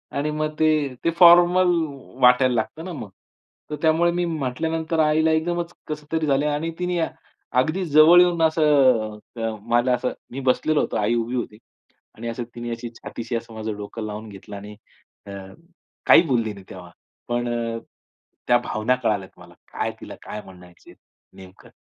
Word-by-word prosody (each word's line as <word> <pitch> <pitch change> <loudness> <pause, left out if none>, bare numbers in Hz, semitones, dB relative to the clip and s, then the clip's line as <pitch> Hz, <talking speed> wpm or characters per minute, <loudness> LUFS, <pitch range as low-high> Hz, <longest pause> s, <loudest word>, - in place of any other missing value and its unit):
आणि 150 +2 -1
मग 155 0 -2
ते 155 - +4 0.3
ते 170 - +2
फॉर्मल 175 +1 +7 0.5
वाटायला 125 0 +5
लागतं 110 +9 -3
ना 185 - -6
मग. 110 -9 -7 0.6
तर 150 - -3
त्यामुळे 165 +2 +3
मी 175 0 -1
म्हटल्यानंतर 160 +2 -2
आईला 155 +1 +3
एकदमच 170 +2 -1
कसं 150 -1 -6
तरी 160 -1 0
झालंय 145 0 +1
आणि 165 +3 -2
तिने 180 -1 -1 0.6
अगदी 160 +7 0
जवळ 155 +3 +7
येऊन 175 -2 +2
असं 135 -9 +3 0.2
अ, 115 0 -1
मला 120 +2 +1
असं 125 +1 -1 0.2
मी 135 - -5
बसलेलो 155 +4 +2
होतो. - - -2
आई 110 +3 +1
उभी 120 +2 -2
होती. 115 -4 -4 0.6
आणि 115 - -7
असं 120 +1 -4
तिने 120 0 -5
अशी 115 0 -5
छातीशी 115 +1 -6
असं 115 0 -5
माझं 110 -1 -4
डोकं 105 +2 -7
लावून 105 +1 -7
घेतलं 100 +1 -11
आणि 105 +1 -9 0.5
अ, - - -8 0.7
काही - - +8
बोलली 115 -5 0
नाही 100 -2 -13
तेव्हा. 90 -2 -11 0.4
पण 120 0 -1
अ, 115 -1 -2 0.7
त्या 120 - +5
भावना 120 0 -1
कळाल्यात 100 -4 -2
मला. - - -15 0.2
काय - - -2
तिला - - -9
काय 105 - -7
म्हणायचंय 90 -2 -16 0.4
नेमकं. 95 0 -15
125 Hz, 165 wpm, -23 LUFS, 115-160 Hz, 0.7 s, काही